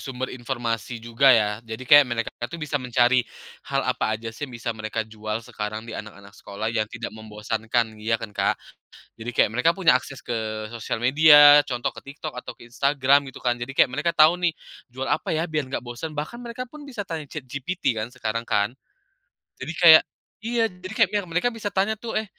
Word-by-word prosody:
sumber 130 -1 -5
informasi 120 -2 -3
juga 115 +4 +2
ya. 105 0 0
Jadi, 115 +2 -8
kayak, 145 +2 +8
mereka 115 -1 -2
itu 120 +8 -6
bisa 150 -3 -3
mencari 125 0 +3 0.5
hal - - 0
apa 110 - 0
aja 115 0 -7
sih, 145 +4 -6
yang 125 - -9
bisa 115 0 -3
mereka 110 0 -4
jual 110 0 -5
sekarang, 110 +1 -5
di 115 - -9
anak-anak 100 -1 -9
sekolah 110 +1 -5
yang 110 -2 -1
tidak 120 -1 -7
membosankan, 110 +1 -2
ya 115 +1 +1
kan 105 -2 -8
Kak? - - 0 0.6
Jadi, 115 +2 -6
kayak, - - +3
mereka 125 +9 +2
punya 170 -9 +4
akses 135 0 -10
ke 110 -2 -4
sosial 115 -1 -4
media, 145 +2 +8
contoh 125 -2 -2
ke 140 - -11
TikTok 150 -3 -7
atau - - -6
ke 120 - -16
Instagram 140 +1 +2
gitu - - -12
kan. 120 -1 0
Jadi, 125 +3 -6
kayak, 130 - +4
mereka 170 +7 -1
tahu 160 +2 +5
nih, 175 -2 0 0.4
"Jual 130 +1 -4
apa - - 0
ya? 160 +1 -1
Biar 155 -3 -1
nggak 130 - -4
bosen," 120 +6 -7
bahkan 150 +11 -5
mereka 245 +1 -7
pun 300 0 -11
bisa 250 -7 -6
tanya 160 -2 -4
ChatGPT 140 -1 -3
kan, 110 +3 -4
sekarang 115 -2 -3
kan. 105 -1 +1 0.9
Jadi, 140 +6 -5
kayak 160 -3 +9 0.4
iya, 230 -2 0
jadi 185 +4 0
kayak, 205 -4 -3
mereka 180 +9 0
bisa 220 -2 -4
tanya 200 +2 -1
tuh, 235 - -5
"Eh 220 - 0
125 Hz, 200 wpm, -24 LUFS, 115-155 Hz, 0.9 s, kayak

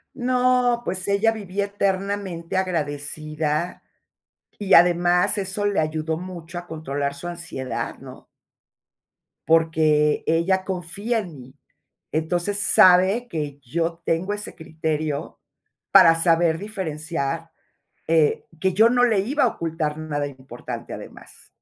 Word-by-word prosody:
No, 250 -1 +2
pues, 185 +1 -2
ella 220 +3 +3
vivía 200 -2 -3
eternamente 195 -3 -2
agradecida 155 -2 -2 0.8
y 200 -2 0
además 175 +3 +4
eso 200 +1 -2
le 205 -1 +1
ayudó 155 +1 -2
mucho 175 -1 -8
a 175 - -12
controlar 140 -3 -3
su 145 +5 -7
ansiedad, 165 -7 -5
¿no? - - -12 1.2
Porque 155 -2 +3
ella 175 +4 +2
confía 195 +6 -1
en 175 -7 -7
mí. 130 +1 -14 0.6
Entonces, 175 +6 -1
sabe 190 +5 +5
que 150 -6 -4
yo 165 +6 -3
tengo 185 +5 0
ese 210 0 -5
criterio 155 -2 -4 0.5
para 165 - +8
saber 165 -1 +3
diferenciar, 165 -5 -4 0.6
eh, 160 -2 +2
que 190 -1 +1
yo 220 +5 +5
no 245 +1 +3
le 220 -5 +3
iba 270 +7 +1
a - - +4
ocultar 160 -4 -3
nada 145 -2 -3
importante, 130 -3 -8
además. - - -12
170 Hz, 120 wpm, -23 LUFS, 155-195 Hz, 1.2 s, para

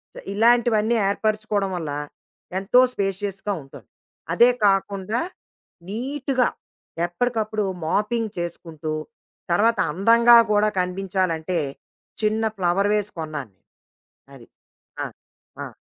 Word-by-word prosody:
స - - -8
ఇలాంటివన్నీ 235 0 +3
ఏర్పరుచుకోవడం 210 -1 0
వల్ల, 160 -4 -4 0.7
ఎంతో 205 +6 +4
స్పేషియస్‌గా 195 0 -2
ఉంటారు. 135 - -14 0.5
అదే 240 +1 +6 0.2
కాకుండా, 200 +3 +1 0.7
నీట్‌గా 260 +3 0 0.6
ఎప్పడికప్పుడు 215 +2 -1 0.2
మాపింగ్ 215 +5 0
చేసుకుంటూ, 165 -2 -5 0.6
తర్వాత 225 +6 +3
అందంగా 230 +7 +6
గూడా 210 0 +4
కనిపించాలంటే, 180 -2 -1 0.6
చిన్న 215 +1 +1
ఫ్లవర్ 190 +3 +2
వేస్ 210 0 -1
కొన్నాను 150 -7 -5
నేను. - - -47 0.7
అది. 120 -3 -15 0.6
ఆ! - - -2 0.6
ఆ! - - -7
205 Hz, 95 wpm, -23 LUFS, 180-225 Hz, 0.7 s, అదే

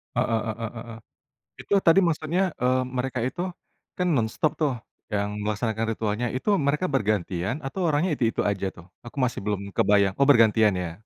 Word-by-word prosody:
Heeh 115 - +1
heeh 115 0 -4
heeh. 115 0 -8 0.6
Itu - - -1
tadi 165 +3 +7
maksudnya, 170 +1 0 0.2
eee, 130 +1 +3 0.2
mereka 125 -1 -2
itu 130 +8 -3 0.6
kan 180 - +1
nonstop 120 +6 0
tuh 150 -4 +1 0.4
yang 100 0 0 0.2
melaksanakan 110 +1 -1
ritualnya, 110 +2 -2
itu 130 - -4
mereka 150 +4 +1
bergantian 100 -3 0
atau 160 +8 -4
orangnya 160 +3 +1
itu-itu 115 -2 +1
aja 100 -1 -2
tuh? 85 - -14 0.2
Aku 120 - -11
masih 125 - -2
belum 105 -1 -1 0.2
kebayang. 100 -2 +3
Oh 140 - +4
bergantian 110 -5 +5
ya. 85 - -4
115 Hz, 165 wpm, -25 LUFS, 105-140 Hz, 0.6 s, tadi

